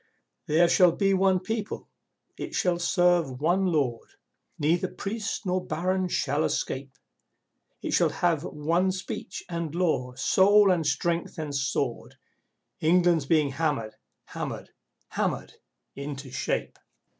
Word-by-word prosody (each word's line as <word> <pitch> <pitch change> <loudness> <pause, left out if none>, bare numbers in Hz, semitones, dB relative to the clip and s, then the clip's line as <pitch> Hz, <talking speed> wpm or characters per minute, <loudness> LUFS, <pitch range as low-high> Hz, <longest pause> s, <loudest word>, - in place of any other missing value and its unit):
There 165 +3 +4
shall 175 -1 +5
be 195 +1 +2
one 190 -1 +3
people, 220 +1 -4 0.5
it - - -6
shall 175 -2 +1
serve 175 -6 +2
one 180 +5 +2
Lord, 140 -9 -1 0.5
(Neither 170 +5 +1
Priest 210 +3 -4
nor 185 0 0
Baron 185 +4 -1
shall 145 -3 0
escape!) 135 0 -2 0.9
It - - -2
shall - - +4
have 165 -4 0
one 170 +5 0
speech 185 0 -6
and 170 -3 -4
law, 140 -8 0
soul 195 +8 +5
and 165 -4 +1
strength 170 +4 -1
and 155 -3 -4
sword. 135 -2 -2 0.6
England's 170 -2 +3
being 150 -3 +3
hammered, 140 -7 -1 0.4
hammered, - - -6 0.4
hammered - - -2 0.4
into 140 -1 -6
shape! - - -2
170 Hz, 120 wpm, -27 LUFS, 145-185 Hz, 0.9 s, shall